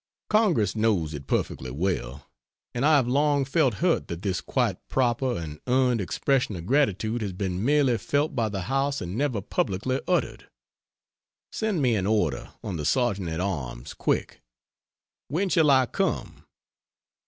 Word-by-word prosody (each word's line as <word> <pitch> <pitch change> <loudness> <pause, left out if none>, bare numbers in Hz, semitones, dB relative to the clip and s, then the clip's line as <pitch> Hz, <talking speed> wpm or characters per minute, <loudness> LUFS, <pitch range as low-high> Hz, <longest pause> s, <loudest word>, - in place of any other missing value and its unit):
Congress 195 - +3
knows 105 -8 +1
it 70 -2 -7
perfectly 65 - -1
well 70 -3 -3 0.5
and 120 - -2
I 155 +1 +5
have 130 -4 +3
long 140 +2 +2
felt 135 -4 +2
hurt 175 - +1
that 85 +1 -6
this 95 -3 -1
quite - - 0
proper 125 -2 +1
and 75 -3 -6
earned 125 -2 +2
expression 125 +3 0
of 85 -1 -7
gratitude 115 -3 +1
has 100 -3 -3
been 95 0 -3
merely 135 -3 +3
felt 145 +6 0
by 115 -4 +1
the 100 -2 -3
House 135 +7 0
and 90 +2 -5
never 130 -5 0
publicly 105 +7 -1
uttered. 180 - -1 1.0
Send 210 -9 -1
me 120 -3 +3
an 95 -2 0
order 105 -10 0
on 100 -6 -4
the 75 - -4
Sergeant 100 - +1
at 80 +1 -3
Arms 70 -11 -4
quick. - - -2 0.9
When 185 +7 -1
shall 160 -4 +4
I 130 -2 +5
come? - - -3
115 Hz, 155 wpm, -26 LUFS, 90-140 Hz, 1.0 s, I